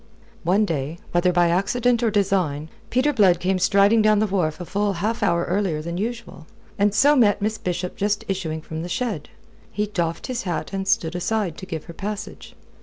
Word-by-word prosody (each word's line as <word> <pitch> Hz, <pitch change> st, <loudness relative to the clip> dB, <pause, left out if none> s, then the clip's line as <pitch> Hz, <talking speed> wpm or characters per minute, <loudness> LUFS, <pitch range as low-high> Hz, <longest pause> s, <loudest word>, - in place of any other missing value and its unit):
One 195 Hz, +5 st, +2 dB
day, 155 Hz, -2 st, -3 dB
whether 175 Hz, +1 st, +3 dB
by 175 Hz, -1 st, +3 dB
accident 235 Hz, +7 st, +1 dB
or 235 Hz, -, +2 dB
design, 185 Hz, -8 st, 0 dB, 0.2 s
Peter 265 Hz, +4 st, +2 dB
Blood 190 Hz, -8 st, +4 dB
came 185 Hz, +1 st, 0 dB
striding 200 Hz, +4 st, +4 dB
down 215 Hz, 0 st, +4 dB
the 215 Hz, -, +3 dB
wharf 180 Hz, -6 st, -1 dB
a 175 Hz, -, -5 dB
full 205 Hz, +2 st, 0 dB
half 210 Hz, +6 st, -2 dB
hour 170 Hz, 0 st, +2 dB
earlier 180 Hz, -4 st, 0 dB
than 170 Hz, +3 st, -4 dB
usual, 230 Hz, -7 st, -5 dB, 0.3 s
and 205 Hz, +1 st, +4 dB
so 285 Hz, +7 st, +5 dB
met 215 Hz, -7 st, +4 dB
Miss 215 Hz, +1 st, -2 dB
Bishop 180 Hz, 0 st, -3 dB
just 205 Hz, +1 st, -1 dB
issuing 165 Hz, -5 st, -3 dB
from 160 Hz, 0 st, -6 dB
the 175 Hz, -, -5 dB
shed. 210 Hz, -, -3 dB, 0.4 s
He 210 Hz, -, -1 dB
doffed 170 Hz, -5 st, -2 dB
his 250 Hz, -2 st, -3 dB
hat 175 Hz, -2 st, -4 dB
and 195 Hz, 0 st, -3 dB
stood 165 Hz, -4 st, +1 dB
aside 185 Hz, -1 st, -1 dB
to 190 Hz, -, -9 dB
give 160 Hz, -4 st, -5 dB
her 170 Hz, -, -10 dB
passage. 205 Hz, +3 st, -6 dB
195 Hz, 195 wpm, -23 LUFS, 170-210 Hz, 0.4 s, so